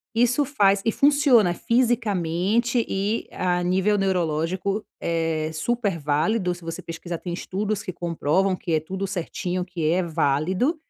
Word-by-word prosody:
Isso 245 +5 +3
faz 200 -8 +2
e 225 - +2
funciona, 275 - +4
fisicamente 230 -1 +1
e 200 +4 -1
a 180 -1 0
nível 190 +4 +2
neurológico 185 +2 0 0.2
é 165 -2 -1
super 205 +1 -1
válido. 170 +7 +1
Se 175 - -14
você 165 0 -5
pesquisar, 165 0 -6
tem 175 - -6
estudos 205 +3 -3
que 185 - -5
comprovam 175 +3 0
que 175 - -6
é 155 - +3
tudo 190 +5 -4
certinho, 180 -1 -3
que 175 -3 -4
é 185 - +2
válido. 170 - +1
185 Hz, 145 wpm, -24 LUFS, 170-215 Hz, 0.2 s, funciona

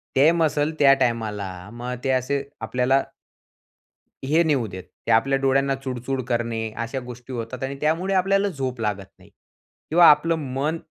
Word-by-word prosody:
ते 145 +5 +6
मसल्स 155 -2 +1
त्या 140 -1 +7
टायमाला 110 -4 -1 0.3
मग 125 +1 -5
ते 135 - -1
असे 140 +2 -2 0.2
आपल्याला 130 +2 +1 1.2
हे 160 +5 +3
नेऊ 140 -8 +1
देत. 95 -1 -8 0.2
ते - - 0
आपल्या 135 +5 +3
डोळ्यांना 135 0 +2
चुळ-चुळ 130 0 -4
करणे 115 -2 -1
अशा 125 +3 -4
गोष्टी 125 +1 -9
होतात 120 +2 -5
आणि 135 +1 -3
त्यामुळे 170 +6 0
आपल्याला 195 +2 +2
झोप 130 -6 -4
लागत 105 -3 -2
नाही. - - -19 0.6
किंवा 170 +2 +6
आपलं 165 +3 +2 0.2
मन 150 +5 -1
135 Hz, 155 wpm, -23 LUFS, 120-150 Hz, 1.2 s, त्या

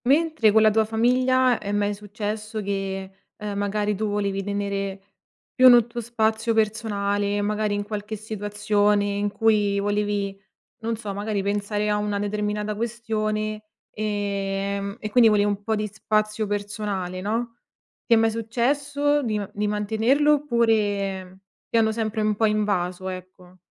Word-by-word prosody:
Mentre 295 -4 +3
con 220 +1 +5
la 215 - +6
tua 220 +1 +3
famiglia 250 +3 +2
è 200 - -5
mai 205 0 +1
successo 210 +1 -5
che, 195 -1 -3 0.3
ehm, 210 -2 -5
magari, 205 +1 0
tu 215 +2 -2
volevi 200 -1 -1
tenere 200 -1 -3 0.5
più 255 -1 +8
n 240 -2 +7
tuo 240 0 -6
spazio 225 0 0
personale 205 -2 0
e, - - 0
magari, 210 0 0
in 205 - -2
qualche 210 +1 -5
situazione 210 -1 0
in 205 0 -1
cui 210 -2 +2
volevi, 205 -1 -1 0.4
non 230 0 -2
so, 210 -3 -5
magari, 205 0 -2
pensare 205 +1 -1
a 210 0 +2
una 210 -1 -1
determinata 210 +1 -2
questione, 215 -1 -2 0.3
ehm, 200 -1 -2
e 215 - -4
quindi 235 -1 +6
volevi 205 -1 +3
un 205 -1 -1
po' 220 +2 -1
di 210 0 -1
spazio 215 +1 -1
personale, 200 -3 -3
no, 230 +4 -2 0.5
ti 235 - +6
è - - +4
mai 225 0 +3
successo 280 +6 0
di 220 -5 -1
ma 205 -1 -3
di 210 +1 -1
mantenerlo 220 +8 +2
oppure 205 -8 0 0.3
ti - - +1
hanno 220 -1 +3
sempre 220 0 -2
un 215 0 +1
po' 220 - +2
invaso, 190 -4 -1
ecco? 185 0 -9
210 Hz, 155 wpm, -24 LUFS, 205-220 Hz, 0.5 s, più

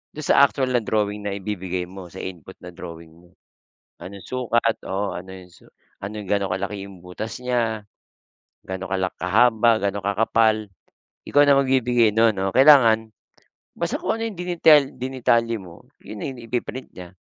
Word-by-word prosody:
dun 155 - -6
sa - - +3
actual 130 -2 -2
na 125 - +3
drawing 105 -2 -2
na 100 - -3
ibibigay 95 -2 -4
mo, 90 +1 -10
sa 95 +2 -9
input 95 0 -9
na 90 - -9
drawing 85 -1 -10
mo. 90 +1 -23 0.7
Anong 95 +2 -9
sukat, 120 -2 0
oo, 100 +1 -2
ano 90 +2 -8
yung 90 -1 -13 0.5
ano 100 - -5
yung, 95 - -12
ganong 100 -2 0
kalaki 100 +2 -4
yung 95 - -13
butas 110 +5 -6
niya, 115 -4 -1 0.8
ga'no 95 0 -6
kala 95 0 -1
kahaba, 115 +4 +3
ga'no 100 0 -1
kakapal. 110 +1 +2 0.6
Ikaw 145 - +4
na 140 - +6
magbibigay 125 -4 +2
nun 110 -1 +4
o 95 0 -1
kailangan 120 -6 +6 0.7
basta - - -2
kung - - -1
ano 225 - -1
yung 200 -6 -10
dinital 165 -4 +5
dinitalye 120 -3 0
mo, 85 -2 -14 0.2
yun - - -9
na 135 - -4
yung 125 - -11
ipi-print 125 +2 -4
niya. 90 0 -10
105 Hz, 165 wpm, -22 LUFS, 95-120 Hz, 0.8 s, na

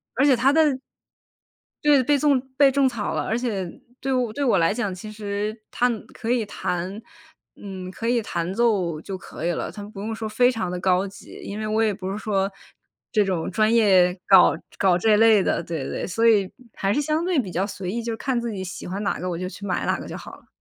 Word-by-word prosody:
而 260 - +2
且 275 -3 +6
它 255 +3 +3
的 305 -4 +4 1.1
对， 295 -2 +5
被 290 +3 +3
粽 280 -2 +3 0.2
被 280 -1 +6
种 275 0 +3
草 225 -4 -3
了。 - - -1
而 225 - -1
且 210 -7 -2 0.3
对 270 - -2
我 245 -4 0
对 285 - -2
我 240 -7 +3
来 165 +2 +3
讲， 205 -4 -2
其 200 +4 -8
实 210 0 -3 0.2
它 245 - +2 0.2
可 230 0 -3
以 240 -3 +1
弹， 190 0 -4 0.5
嗯， 190 -2 -7
可 225 - -5
以 240 0 +2
弹 175 -4 -3
奏 195 -8 +1
就 190 +2 -6
可 170 -2 -8
以 175 - +2
了， - - -3
它 205 - -8
不 205 -1 -10
用 215 +3 -3
说 220 0 -4
非 245 +4 +3
常 225 -7 -3
地 180 - -3
高 185 +1 +2
级。 195 - -12
因 205 - -6
为 215 - -3
我 220 +1 +1
也 215 -2 +2
不 190 -1 -5
是 200 - -3
说， 200 -2 -1 0.6
这 215 -3 +3
种 185 -4 -1
专 215 +1 +2
业 185 -5 +4
搞 190 -3 +7 0.2
搞 185 -3 +3
这 210 +3 +4
类 220 -2 +6
的， - - 0
对 160 -5 -4
对。 - - -4
所 225 +5 +2
以 205 -4 +4 0.2
还 195 -1 -1
是 290 - +1
相 305 +3 0
对 355 -4 +1
比 200 -8 -3
较 180 +3 0
随 195 -3 -5
意， 235 +3 -2
就 230 -1 -4
看 260 -1 -1
自 235 -1 -3
己 190 -3 -4
喜 180 - -7
欢 195 +3 -4
哪 200 - -1
个 180 - -3
我 170 - -3
就 180 +1 -3
去 200 +2 -8
买 195 - -1
哪 - - 0
个 - - -8
就 - - -6
好 - - -10
了。 - - -22
210 Hz, 255 characters per minute, -24 LUFS, 190-235 Hz, 1.1 s, 搞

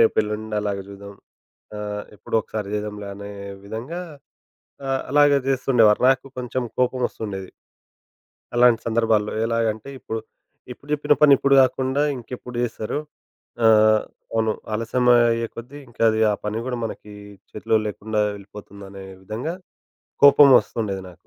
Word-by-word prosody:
రేపెళ్ళుండి 110 -1 +1
అలాగా 100 -2 -3
జూద్దాం. 100 0 -11 0.6
ఆహ్, 105 0 -5
ఎప్పుడో 110 - -5
ఒకసారి 105 -1 -5
జేద్దాంలే 105 -1 -4
అనే 100 0 -8 0.3
విధంగా 115 - -6 0.9
ఆహ్, 135 0 0
అలాగా 145 0 +5
జేస్తుండేవారు. 125 -5 +3
నాకు 135 0 +1
కొంచెం 125 0 -3
కోపం 125 0 +1
వస్తుండేది. 95 -4 -7 1.1
అలాంటి 120 -2 +5
సందర్భాల్లో 110 -2 +1
ఎలాగంటే 115 +1 -1
ఇప్పుడు, 110 0 -5 0.5
ఇప్పుడు 140 +4 -13
జెప్పిన 150 0 +3
పని 145 -2 +8
ఇప్పుడు 140 0 +3
గాకుండా 130 +2 +1
ఇంకెప్పుడు 125 0 -9
జేస్తారు? 115 +3 -3 0.7
ఆహ్, 110 -1 +5 0.3
అవును. 110 -1 +1 0.2
ఆలస్యమయ్యే 120 0 +2
కొద్ది 125 +5 -9
ఇంకది 115 -1 +1
ఆ - - 0
పని 105 +2 -2
గూడా 125 -1 -3
మనకి 105 -1 -7 0.4
చేతిలో 110 +1 0
లేకుండా 105 +1 -2
వెళ్ళిపోతుందనే 100 -1 -11 0.2
విధంగా 115 - -4 0.7
కోపం 140 0 +8
వస్తుండేది 100 -4 -4
నాకు. 85 0 -21
110 Hz, 120 wpm, -22 LUFS, 105-125 Hz, 1.1 s, పని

